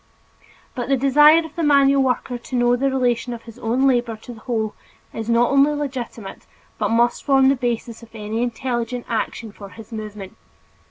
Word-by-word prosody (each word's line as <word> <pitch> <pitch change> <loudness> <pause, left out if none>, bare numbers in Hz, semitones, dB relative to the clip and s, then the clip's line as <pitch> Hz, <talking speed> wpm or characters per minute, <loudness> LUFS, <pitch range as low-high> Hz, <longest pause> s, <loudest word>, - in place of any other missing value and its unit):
But 250 -2 -5
the 275 - +3
desire 295 +5 +5
of 315 - -12
the 340 - -3
manual 280 -2 +4
worker 250 -1 -1
to 255 - -7
know 245 0 +3
the 275 +2 0
relation 245 -2 0
of 230 - -12
his 230 -2 -13
own 245 +4 0
labor 240 -3 +1
to 245 - -9
the 225 - -13
whole 220 -3 -2 0.4
is 225 0 -5
not 235 +2 +3
only 280 +2 +4
legitimate 255 -8 -6 0.3
but - - 0
must 235 +1 +1
form 270 -2 +4
the 275 - +3
basis 240 -2 -3
of 230 - -14
any 215 +1 -3
intelligent 240 0 -3
action 225 -1 -3
for 200 -1 -11
his 225 +3 -13
improvement. 210 -3 -8
245 Hz, 185 wpm, -21 LUFS, 230-270 Hz, 0.4 s, desire